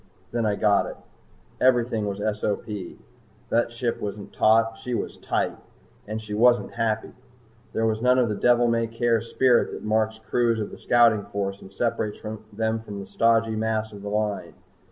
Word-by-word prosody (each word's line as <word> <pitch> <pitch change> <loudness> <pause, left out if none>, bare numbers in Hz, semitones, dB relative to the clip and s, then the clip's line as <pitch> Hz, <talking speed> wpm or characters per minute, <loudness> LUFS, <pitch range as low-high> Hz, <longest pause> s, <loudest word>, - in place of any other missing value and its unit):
Then 115 -2 0
I 105 - +1
got 105 -1 +3
it. - - -7 0.6
Everything 120 -4 +2
was 100 -1 -3 0.2
SOP. 105 -1 -1
The 105 +3 -4
ship 120 0 -3
wasn't 100 -1 -6
taut, 115 +1 +3
she 125 -1 -3
was - - -4
tight! - - -1 0.5
And 110 +1 -3
she 110 -1 -7
wasn't 120 +3 +3
happy. 110 -1 -1 0.6
There 115 - +1
was 110 0 0
none 125 +1 +4
of 125 -2 +3
the 105 - -1
devil 120 +3 +3
may 115 -1 +1
care 115 0 +1
spirit 120 +1 +3
that - - -7
marks 110 0 +1
crews 115 +1 0
in 105 - -4
the - - -9
Scouting 115 -4 +4
Force 100 -1 -4
and 95 - -12
separates 105 0 -2
them 110 +1 -3
from 105 -2 -8
the 100 - -6
stodgy 115 +2 +2
mass 110 0 -1
of 100 - -9
the 100 - -5
Line. 105 -6 -2
110 Hz, 175 wpm, -25 LUFS, 105-115 Hz, 0.6 s, none